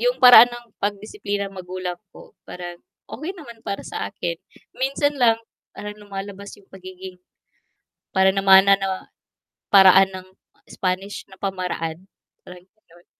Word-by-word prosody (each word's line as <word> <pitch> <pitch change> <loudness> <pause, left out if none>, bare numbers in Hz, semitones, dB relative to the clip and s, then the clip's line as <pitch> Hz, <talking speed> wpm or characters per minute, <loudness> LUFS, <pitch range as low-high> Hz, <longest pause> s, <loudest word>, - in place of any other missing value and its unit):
'yung - - +1
paraan 245 -2 +9
ng 240 0 -10 0.2
pag-disiplina 205 0 -3
magulang 185 -1 -6 0.2
ko, - - -16
parang 175 -1 -9 0.3
okey 310 +9 -6
naman 235 -7 -12
para 200 - -5
sa - - -5
akin, 175 -4 -4 0.4
minsan 275 +2 0
lang 235 -4 +3 0.4
parang 210 0 -7
lumalabas 200 0 -8
yung 200 - -22
pagiging 185 -1 -11 0.9
para 190 0 +4
namana 195 0 +5
'no, 190 -1 -4 0.6
paraan 190 -1 +7
ng 185 -1 -10 0.4
Spanish 190 +2 -4
na 190 - -16
pamaraan 180 -4 -4 0.4
parang 180 0 -14
ganon 175 -4 -25
195 Hz, 125 wpm, -22 LUFS, 185-210 Hz, 0.9 s, paraan